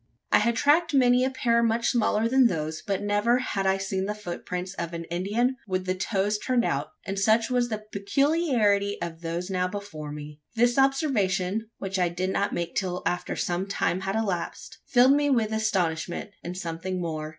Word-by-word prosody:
I - - +6
had 235 +2 +1
tracked 300 +5 +3
many 250 -1 +5
a 260 - +2
pair 235 -3 +1
much 230 0 +2
smaller 225 -2 +2
than 260 +1 +5
those; 155 -4 -3
but 200 0 -2
never 205 +4 +2
had 195 -6 -1
I 190 0 +3
seen 195 -1 -2
the 210 +1 -3
footprints 180 -1 -5
of 170 -3 -5
an 165 - -4
Indian 215 +9 0
with 185 -1 -1
the 185 - 0
toes 200 +2 0
turned 250 0 +1
out; 140 +1 -2
and 195 0 -3
such 220 +4 +3
was 245 -1 +1
the 215 -1 -4
peculiarity 210 - +1
of 165 -1 -5
those 170 +3 -3
now 180 -1 +1
before 180 -7 -6
me. 150 0 -9
This 240 +3 +3
observation 220 - +1
which 195 -1 -3
I 180 -1 +2
did 185 +2 -2
not 200 +1 0
make 170 0 -3
till 180 -2 -2
after 175 - -1
some 180 +2 -1
time 190 -2 0
had 195 +1 -2
elapsed 195 -6 -3
filled 255 +1 +6
me 290 0 +2
with 230 -5 +2
astonishment, 185 -4 -1
and 180 +1 -5
something 180 +1 -4
more. 155 -3 -3
200 Hz, 190 wpm, -26 LUFS, 180-235 Hz, -, I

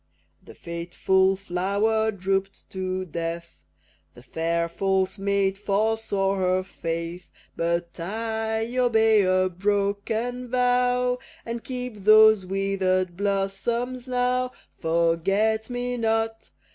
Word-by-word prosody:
The - - -14
fateful 180 +3 +1
flower 200 +4 0
droop'd 195 0 -3
to 185 0 -3
death, 170 0 -5 0.6
The 120 - -14
fair, 170 +4 -1
false 190 +2 0
maid 195 -1 0
forswore 205 -1 0
her 185 0 +1
faith; 170 0 -5 0.3
But 170 +1 -2
I 220 +4 -2
obey 225 -3 +4
a 185 0 +3
broken 205 +6 -1
vow, 250 0 +2 0.3
And 230 0 -5
keep 250 -3 -5
those 215 -2 +7
wither'd 190 -2 0
blossoms 205 +6 -2
now! 250 0 0 0.3
Forget 185 +7 +1
me 245 0 -3
not! 225 -1 -1
200 Hz, 100 wpm, -25 LUFS, 185-225 Hz, 0.6 s, those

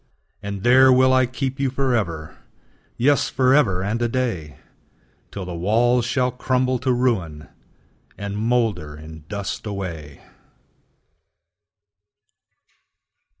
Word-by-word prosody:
And 100 -1 -6
there 130 +2 +6
will 130 0 +4
I 130 -1 +3
keep 130 +2 -4
you 135 -1 +1
forever, 115 - -2 0.6
Yes, 140 +3 +2
forever 125 -8 +2
and 110 +4 -2
a 120 - +2
day, 115 - -3 0.7
Till 100 -2 -7
the 90 - -6
walls 115 +7 +2
shall 125 0 0
crumble 130 0 0
to 130 +1 0
ruin, 105 -12 -1 0.7
And 100 0 -5
moulder 110 -9 -1
in 80 0 -12
dust 100 +1 -5
away! 85 -8 -6
115 Hz, 105 wpm, -22 LUFS, 90-130 Hz, 0.7 s, there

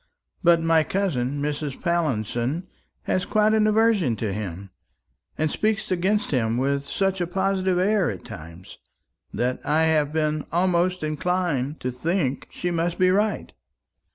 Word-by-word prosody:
But 170 -1 +6
my 165 -1 +4
cousin 145 -9 -1
Mrs. 145 -1 -3
Pallinson 150 - -1 0.4
has 185 - 0
quite 215 +1 +2
an 215 -1 +3
aversion 215 - +3
to 105 -2 -3
him, 95 -2 -6 0.7
and 155 -1 0
speaks 215 -1 -1
against 190 +4 +1
him 115 -4 +1
with 140 +2 0
such 195 +4 -1
a 175 - 0
positive 190 0 0
air 195 0 +2
at 95 - -7
times, 85 +3 -11 0.5
that 125 +1 -2
I 155 +2 +2
have 155 -2 +2
been 155 -1 -1
almost 180 +1 +1
inclined 155 -3 -1
to 125 - -2
think 140 +1 -1
she 180 - -3
must 170 0 -1
be 185 0 +4
right. 205 +2 0
165 Hz, 145 wpm, -24 LUFS, 135-185 Hz, 0.7 s, But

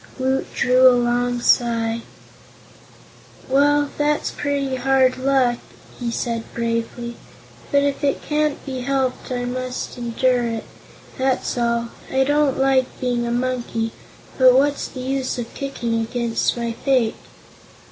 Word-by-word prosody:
Woot 265 0 -1
drew 255 +1 +5
a 250 - +4
long 245 0 0
sigh. 230 -1 +2 1.5
"Well, 290 +2 +3
that's 295 +1 +1
pretty 280 -2 -2
hard 260 0 +3
luck," 260 -2 +2 0.4
he 240 -2 -2
said 230 -1 -3
bravely, 235 +1 -3 0.5
"but 280 0 +4
if 285 0 -1
it 280 - 0
can't 300 -1 -1
be 265 -2 -4
helped 260 0 -1
I 245 -1 -2
must 255 0 -4
endure 245 +1 +1
it; 225 -1 -3 0.6
that's 260 0 0
all. 235 -1 0 0.2
I 265 0 +3
don't 290 0 +2
like 265 -1 +1
being 245 -2 -1
a - - -1
monkey, 240 -2 -1 0.5
but 255 -1 +7
what's 285 +2 +2
the 255 - -8
use 265 0 -2
of 235 -1 -5
kicking 240 -5 -2
against 235 +1 -1
my 235 -1 -2
fate?" 240 -1 +1
255 Hz, 135 wpm, -21 LUFS, 235-270 Hz, 1.5 s, but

